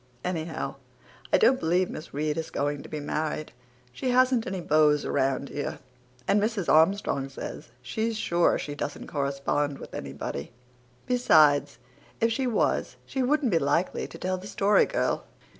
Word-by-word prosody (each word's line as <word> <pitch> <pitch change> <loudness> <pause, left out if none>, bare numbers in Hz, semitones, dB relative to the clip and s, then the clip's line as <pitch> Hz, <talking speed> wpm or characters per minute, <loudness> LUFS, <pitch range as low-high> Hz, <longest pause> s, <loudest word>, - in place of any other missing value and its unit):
Anyhow, 165 -3 -3 0.5
I - - +6
don't 265 - +4
believe 175 +3 +2
Miss 155 - -8
Reade 150 +2 -1
is 160 - -4
going 145 0 -2
to - - -11
be 155 - -4
married. 155 +1 -3 0.4
She 255 - -2
hasn't 255 -1 +3
any 190 0 -3
beaus 150 -3 +3
around 135 +1 0
here 145 - -4 0.5
and 205 - +3
Mrs. 210 -4 -1
Armstrong 160 -4 +3
says 135 - -7
she's 220 - -2
sure 175 -4 +2
she 145 - -5
doesn't 145 - -5
correspond 140 0 -1
with - - -11
anybody. 70 +3 -5 0.5
Besides, 150 - +4 0.4
if 230 0 +2
she 260 +3 0
was 235 - 0
she 265 - -2
wouldn't 265 -1 +2
be 165 - +3
likely 145 +6 0
to - - -11
tell 185 0 -2
the 190 - -9
Story 205 0 +3
Girl." - - 0
160 Hz, 160 wpm, -27 LUFS, 145-210 Hz, 0.5 s, I